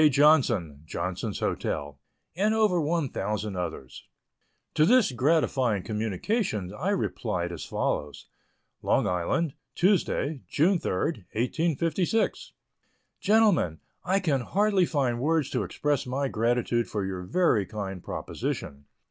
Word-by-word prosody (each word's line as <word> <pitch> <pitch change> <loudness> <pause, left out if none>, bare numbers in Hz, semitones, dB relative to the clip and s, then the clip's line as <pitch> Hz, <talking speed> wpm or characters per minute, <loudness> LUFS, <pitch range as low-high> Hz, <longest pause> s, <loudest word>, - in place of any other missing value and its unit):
Johnson, 125 - +3
Johnson's 90 +5 -3
Hotel, 70 -1 -2 0.4
and 210 +4 +2
over 210 -6 +3
1,000 110 - -2
others. 85 -7 -6 0.7
To 150 - +3
this 240 - +5
gratifying 130 - +1
communication 105 - -2
I 155 - -2
replied 105 - -1
as 85 - -6
follows: 75 0 -2 0.6
LONG - - +2
ISLAND, 110 - 0 0.2
Tuesday, 160 -6 +1
June 175 +5 +3
3, - - -2 0.4
1856. 165 - 0 0.7
GENTLEMEN, 205 - +3 0.2
I 190 +2 +2
can 150 -9 +1
hardly 195 - +2
find 130 -6 0
words 155 0 +1
to - - 0
express 145 -4 -1
my 135 +2 -1
gratitude 120 +1 0
for 105 -3 -2
your 95 -1 -4
very 110 - +2
kind 95 -4 -5
proposition. 70 0 -5
130 Hz, 115 wpm, -27 LUFS, -, 0.7 s, this